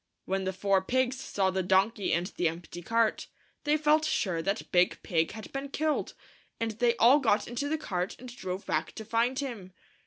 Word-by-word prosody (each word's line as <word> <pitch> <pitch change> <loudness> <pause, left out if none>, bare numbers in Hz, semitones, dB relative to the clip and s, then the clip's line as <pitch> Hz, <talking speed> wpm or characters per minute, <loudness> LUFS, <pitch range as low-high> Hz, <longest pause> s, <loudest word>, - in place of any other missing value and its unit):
When 190 0 -1
the 190 - 0
four 195 +1 +2
pigs 260 +5 0
saw 195 -7 0
the 190 0 0
donkey 190 +3 +2
and 170 +1 +1
the 180 -2 -1
empty 170 +1 -6
cart, 230 +4 +1 0.4
they 300 +1 +3
felt 305 +1 +3
sure 190 - 0
that 195 +5 -2
Big 180 0 +3
Pig 165 0 0
had 220 0 -9
been 275 +1 -4
killed, 310 +2 -1 0.4
and 230 -1 -1
they 235 +2 +2
all 250 +5 +6
got 220 -6 +2
into 250 +5 -3
the 315 - 0
cart 180 - -3
and 245 0 -10
drove 185 -3 -5
back - - -1
to 220 - -8
find 235 +4 +1
him. 230 -10 -5
220 Hz, 195 wpm, -29 LUFS, 185-255 Hz, 0.4 s, all